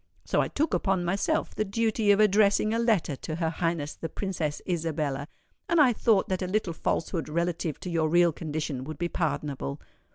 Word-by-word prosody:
So -, -, +2 dB
I -, -, 0 dB
took 310 Hz, +3 st, -1 dB
upon 190 Hz, -3 st, +1 dB
myself 195 Hz, +3 st, 0 dB
the -, -, 0 dB
duty 220 Hz, +1 st, 0 dB
of 205 Hz, 0 st, +6 dB
addressing 210 Hz, +1 st, +4 dB
a 230 Hz, -, +1 dB
letter 215 Hz, -, +1 dB
to 155 Hz, -, -5 dB
her 165 Hz, -1 st, -1 dB
Highness 165 Hz, -3 st, -2 dB
the 165 Hz, -, -6 dB
Princess 165 Hz, -5 st, -3 dB
Isabella, 155 Hz, -5 st, -2 dB, 0.4 s
and 340 Hz, -, +3 dB
I 265 Hz, -5 st, +6 dB
thought 220 Hz, -3 st, +2 dB
that 185 Hz, 0 st, -2 dB
a 185 Hz, -, -1 dB
little 185 Hz, -2 st, -1 dB
falsehood 165 Hz, 0 st, -2 dB
relative 170 Hz, -1 st, -1 dB
to 180 Hz, -, -5 dB
your 160 Hz, -2 st, +1 dB
real 175 Hz, +1 st, +5 dB
condition 150 Hz, -4 st, -4 dB
would 155 Hz, +2 st, -6 dB
be 175 Hz, 0 st, -2 dB
pardonable. 145 Hz, -, -2 dB
175 Hz, 190 wpm, -27 LUFS, 155-200 Hz, 0.4 s, of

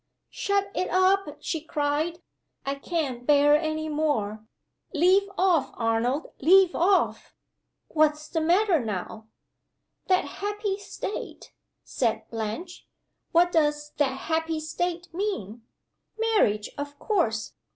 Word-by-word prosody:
"Shut 400 Hz, 0 st, 0 dB
it 365 Hz, -, -1 dB
up," 380 Hz, +1 st, +3 dB
she 320 Hz, -, -3 dB
cried. 310 Hz, +2 st, -1 dB, 0.4 s
"I 275 Hz, -, 0 dB
can't 275 Hz, -4 st, -3 dB
bear 290 Hz, 0 st, +6 dB
any 310 Hz, 0 st, -1 dB
more. 240 Hz, -9 st, -1 dB, 0.5 s
Leave 375 Hz, +5 st, +4 dB
off, 360 Hz, -6 st, +3 dB
Arnold 235 Hz, +6 st, 0 dB
leave 365 Hz, +4 st, +6 dB
off!" 375 Hz, +3 st, +1 dB, 0.5 s
"What's, 305 Hz, -1 st, +1 dB
the 325 Hz, -, -1 dB
matter 350 Hz, -, +3 dB
now?" 220 Hz, +1 st, -5 dB, 0.8 s
"'That 370 Hz, -1 st, +3 dB
happy 410 Hz, 0 st, -3 dB
state,'" 405 Hz, 0 st, -7 dB, 0.3 s
said 230 Hz, -4 st, -1 dB
Blanche. 225 Hz, -, -5 dB, 0.4 s
"What 350 Hz, +1 st, +4 dB
does 295 Hz, -2 st, +1 dB
'that 270 Hz, -2 st, 0 dB
happy 320 Hz, 0 st, -1 dB
state' 345 Hz, +2 st, -3 dB
mean? 235 Hz, -, -4 dB, 0.5 s
Marriage, 420 Hz, -, +1 dB
of 285 Hz, 0 st, -5 dB
course! 235 Hz, -, 0 dB
315 Hz, 110 wpm, -26 LUFS, 275-365 Hz, 0.8 s, bear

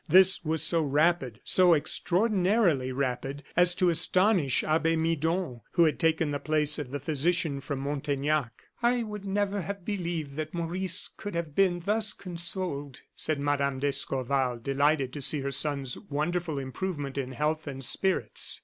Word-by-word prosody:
This 190 Hz, 0 st, +6 dB
was 160 Hz, -1 st, 0 dB
so 165 Hz, 0 st, +3 dB
rapid, 145 Hz, -5 st, +1 dB
so 180 Hz, -2 st, +5 dB
extraordinarily 180 Hz, -, +1 dB
rapid, 135 Hz, +2 st, -3 dB
as 180 Hz, 0 st, +5 dB
to 180 Hz, -1 st, +3 dB
astonish 175 Hz, -, +3 dB
Abbe 165 Hz, +1 st, +1 dB
Midon, 160 Hz, -4 st, -1 dB
who 170 Hz, -, +4 dB
had 155 Hz, -2 st, +1 dB
taken 160 Hz, -2 st, +2 dB
the 145 Hz, -, -2 dB
place 155 Hz, 0 st, +2 dB
of 145 Hz, -4 st, -5 dB
the 145 Hz, +2 st, -4 dB
physician 150 Hz, 0 st, 0 dB
from 140 Hz, -1 st, -4 dB
Montaignac. 145 Hz, -1 st, -2 dB, 0.2 s
"I 240 Hz, 0 st, +2 dB
never 205 Hz, -1 st, -2 dB
would 180 Hz, -, -5 dB
have 200 Hz, -3 st, -6 dB
believed 170 Hz, -8 st, -3 dB
that 155 Hz, +1 st, -4 dB
Maurice 175 Hz, +2 st, 0 dB
could 205 Hz, -4 st, -8 dB
have 165 Hz, -3 st, -3 dB
been 180 Hz, 0 st, +2 dB
thus 210 Hz, +3 st, 0 dB
consoled," 170 Hz, -6 st, -5 dB
said 155 Hz, -2 st, -1 dB
Mme. 140 Hz, -1 st, 0 dB
d'Escorval, 135 Hz, -2 st, -1 dB
delighted 140 Hz, +2 st, 0 dB
to 145 Hz, -, -6 dB
see 145 Hz, +2 st, 0 dB
her 140 Hz, 0 st, -3 dB
son's 140 Hz, -2 st, -1 dB
wonderful 160 Hz, +2 st, -2 dB
improvement 140 Hz, +1 st, -4 dB
in 130 Hz, -2 st, -4 dB
health 155 Hz, +3 st, -1 dB
and 135 Hz, -2 st, -4 dB
spirits. 190 Hz, +8 st, 0 dB
155 Hz, 155 wpm, -28 LUFS, 140-180 Hz, 0.2 s, This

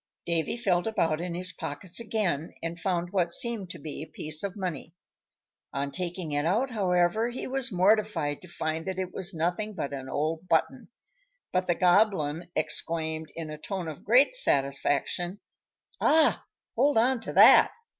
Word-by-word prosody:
Davy 165 Hz, +5 st, -1 dB
felt 190 Hz, -5 st, 0 dB
about 165 Hz, -7 st, 0 dB
in 175 Hz, -1 st, -4 dB
his 185 Hz, +1 st, -1 dB
pockets 170 Hz, +5 st, -4 dB
again, 200 Hz, -9 st, -2 dB
and 165 Hz, +1 st, -4 dB
found 175 Hz, -2 st, -2 dB
what 180 Hz, -4 st, 0 dB
seemed 225 Hz, -3 st, +1 dB
to -, -, -8 dB
be 145 Hz, 0 st, -7 dB
a 160 Hz, -, -7 dB
piece 155 Hz, 0 st, -3 dB
of 200 Hz, -2 st, -4 dB
money. 175 Hz, -3 st, -5 dB, 0.8 s
On 140 Hz, +1 st, -3 dB
taking 175 Hz, -2 st, -4 dB
it 145 Hz, 0 st, 0 dB
out, 220 Hz, -, 0 dB
however, 190 Hz, +1 st, +1 dB
he 240 Hz, -, -6 dB
was 265 Hz, -1 st, 0 dB
mortified 185 Hz, -6 st, +1 dB
to 185 Hz, -, -13 dB
find 160 Hz, 0 st, -4 dB
that 190 Hz, -1 st, -3 dB
it 185 Hz, -1 st, -4 dB
was 190 Hz, 0 st, +1 dB
nothing 180 Hz, +5 st, -2 dB
but 140 Hz, -6 st, -4 dB
an 135 Hz, -1 st, -6 dB
old 160 Hz, +5 st, -2 dB
button; 245 Hz, +10 st, 0 dB, 0.7 s
but 185 Hz, 0 st, 0 dB
the 175 Hz, -, +2 dB
Goblin 175 Hz, -4 st, +2 dB
exclaimed, 160 Hz, 0 st, +1 dB
in 160 Hz, -2 st, -6 dB
a 155 Hz, -, -8 dB
tone 190 Hz, 0 st, -5 dB
of 155 Hz, -3 st, -8 dB
great 250 Hz, -, +4 dB
satisfaction, 145 Hz, -, +1 dB, 0.6 s
"Ah! 315 Hz, -1 st, +3 dB, 0.3 s
hold 285 Hz, -3 st, +2 dB
on 250 Hz, +2 st, +3 dB
to 225 Hz, -, -6 dB
that!" -, -, +7 dB
175 Hz, 165 wpm, -27 LUFS, 160-210 Hz, 0.8 s, that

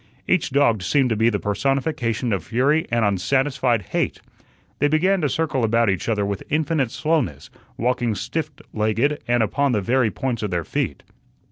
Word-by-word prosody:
Each 180 Hz, -3 st, +2 dB
dog 130 Hz, -7 st, +2 dB
seemed 130 Hz, +6 st, +2 dB
to -, -, +2 dB
be 110 Hz, +2 st, +3 dB
the 105 Hz, -, 0 dB
personification 120 Hz, +1 st, -1 dB
of 95 Hz, -5 st, -2 dB
fury 140 Hz, -, +1 dB
and 115 Hz, -2 st, +1 dB
unsatisfied 120 Hz, +3 st, +1 dB
hate. -, -, -1 dB, 0.6 s
They 145 Hz, -, +3 dB
began 180 Hz, +6 st, +2 dB
to 150 Hz, -, +1 dB
circle 150 Hz, -4 st, -1 dB
about 115 Hz, -1 st, +3 dB
each 95 Hz, -, -3 dB
other 105 Hz, -3 st, +1 dB
with 100 Hz, -1 st, -3 dB
infinite 155 Hz, -4 st, +1 dB
slowness, 125 Hz, -, -1 dB, 0.3 s
walking 120 Hz, -2 st, 0 dB
stiffed 155 Hz, +4 st, -4 dB
legged 115 Hz, +7 st, +1 dB
and 120 Hz, -1 st, +3 dB
upon 140 Hz, +4 st, +1 dB
the 105 Hz, -, +2 dB
very 120 Hz, +3 st, +2 dB
points 120 Hz, +3 st, -3 dB
of 105 Hz, -, -2 dB
their 85 Hz, -3 st, -2 dB
feet. -, -, -3 dB
120 Hz, 170 wpm, -22 LUFS, 110-145 Hz, 0.6 s, be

